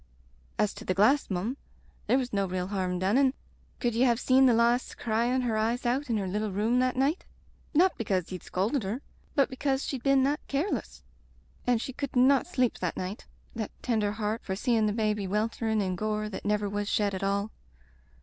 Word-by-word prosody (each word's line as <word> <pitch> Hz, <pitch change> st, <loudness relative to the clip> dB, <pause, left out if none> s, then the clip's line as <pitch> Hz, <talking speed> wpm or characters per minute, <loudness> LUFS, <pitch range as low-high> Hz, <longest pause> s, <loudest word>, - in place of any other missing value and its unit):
As 210 Hz, -, +1 dB
to -, -, -10 dB
the 185 Hz, -, -1 dB
glass, 250 Hz, +9 st, +4 dB
mum, 200 Hz, +8 st, -2 dB, 0.5 s
there 255 Hz, -, +4 dB
was 250 Hz, -3 st, -2 dB
no 200 Hz, -1 st, +1 dB
real 180 Hz, 0 st, -2 dB
harm 185 Hz, -3 st, -1 dB
done, 195 Hz, +8 st, +2 dB
an' 270 Hz, -1 st, +3 dB, 0.4 s
could 240 Hz, -2 st, 0 dB
ye 230 Hz, -, 0 dB
have 240 Hz, -3 st, +4 dB
seen 260 Hz, +1 st, +5 dB
the 245 Hz, -, +5 dB
lass 235 Hz, +2 st, +2 dB
cryin' 235 Hz, +3 st, 0 dB
her 240 Hz, -3 st, 0 dB
eyes 230 Hz, +3 st, 0 dB
out 260 Hz, +3 st, 0 dB
in 225 Hz, -, +1 dB
her 195 Hz, -2 st, -2 dB
little 210 Hz, +2 st, -2 dB
room 220 Hz, +6 st, +1 dB
that 255 Hz, 0 st, +1 dB
night... 275 Hz, +7 st, +1 dB, 0.5 s
• -, -, +3 dB
Not 365 Hz, +3 st, +5 dB
because 190 Hz, -6 st, -1 dB
ye'd 185 Hz, -, -5 dB
scolded 215 Hz, +9 st, -1 dB
her, 215 Hz, +7 st, -4 dB, 0.3 s
but 275 Hz, -2 st, +4 dB
because 270 Hz, +1 st, -1 dB
she'd 265 Hz, -4 st, -3 dB
been 275 Hz, 0 st, +4 dB
that 285 Hz, +2 st, +1 dB
careless. 290 Hz, +8 st, -2 dB, 0.6 s
And 245 Hz, -2 st, +3 dB
she 260 Hz, -, -5 dB
could 280 Hz, 0 st, -5 dB
not 260 Hz, +2 st, +4 dB
sleep 255 Hz, -9 st, 0 dB
the 180 Hz, -2 st, -1 dB
night, 185 Hz, +4 st, -5 dB, 0.3 s
that 220 Hz, -3 st, -3 dB
tender 215 Hz, -4 st, +1 dB
heart, 215 Hz, +1 st, -2 dB
for 190 Hz, -, -3 dB
seein' 225 Hz, 0 st, +2 dB
the -, -, +1 dB
baby 210 Hz, -2 st, 0 dB
wel 210 Hz, +4 st, +1 dB
terin' 220 Hz, -2 st, -1 dB
in 185 Hz, -1 st, -1 dB
gore 215 Hz, +2 st, -2 dB
that 190 Hz, -, -7 dB
never 210 Hz, 0 st, +1 dB
was 205 Hz, +1 st, -2 dB
shed 205 Hz, -2 st, +1 dB
at 190 Hz, -, -4 dB
all. 200 Hz, +2 st, 0 dB
225 Hz, 210 wpm, -28 LUFS, 205-255 Hz, 0.6 s, seen